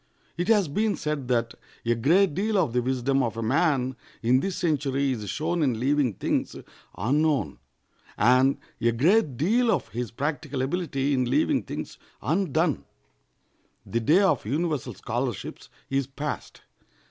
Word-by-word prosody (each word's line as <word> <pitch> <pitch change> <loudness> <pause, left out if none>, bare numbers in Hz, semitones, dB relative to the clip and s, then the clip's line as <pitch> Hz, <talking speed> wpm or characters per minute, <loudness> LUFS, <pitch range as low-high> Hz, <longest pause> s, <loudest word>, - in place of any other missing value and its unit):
It 175 +2 -2
has 210 -5 +4
been 210 +8 0
said 150 -4 -3
that 115 -2 0 0.3
a 120 - +3
great 160 - +3
deal 210 +5 0
of 125 -11 +1
the 125 - +2
wisdom 130 +2 +1
of 115 -3 -2
a 115 - -2
man 130 0 +1 0.3
in 125 +3 +4
this 195 +4 -2
century 140 -4 0
is 105 -6 -4
shown 160 - -1
in 130 -7 +1
leaving 135 -2 +2
things - - -1 0.4
unknown, 140 - +1 0.6
and 130 +4 +4 0.2
a 115 - +3
great 150 - +3
deal 230 - +2
of - - 0
his 120 0 -4
practical 145 +1 -3
ability 140 -2 -1
in 130 -2 +1
leaving - - +2
things - - -7 0.2
undone. 160 - 0 1.0
The 115 - -1
day 155 - +4
of 170 -10 +2
universal 150 +3 -2
scholarships 120 -2 -4 0.2
is 135 -1 0
past. 140 +2 -6
140 Hz, 145 wpm, -26 LUFS, 125-165 Hz, 1.0 s, has